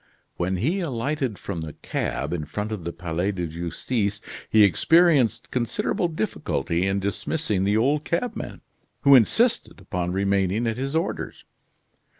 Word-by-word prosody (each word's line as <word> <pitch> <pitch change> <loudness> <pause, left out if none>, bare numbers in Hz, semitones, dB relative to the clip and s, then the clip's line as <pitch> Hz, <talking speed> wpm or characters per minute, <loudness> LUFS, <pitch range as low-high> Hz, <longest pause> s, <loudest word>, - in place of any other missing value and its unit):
When 90 +2 0
he 155 - 0
alighted 135 - -2
from 85 -5 -5
the 80 -2 -6
cab - - -3
in 80 -3 -2
front 105 +7 -4
of 100 -6 -5
the 85 - -2
Palais 85 +3 -2
de 90 -2 -2
Justice, 100 +6 -2 0.3
he 110 -1 +6
experienced 145 - +4
considerable 125 +8 0
difficulty 125 - -1
in 95 +1 +1
dismissing 100 +1 -1
the 105 +2 +2
old 140 +6 +2
cabman, 175 +11 -3 0.4
who 140 - +6
insisted 220 - +3
upon 90 -2 -3
remaining 100 +3 +1
at 115 0 -1
his 135 +3 -3
orders. 165 +3 -3
105 Hz, 145 wpm, -24 LUFS, 95-140 Hz, 0.4 s, he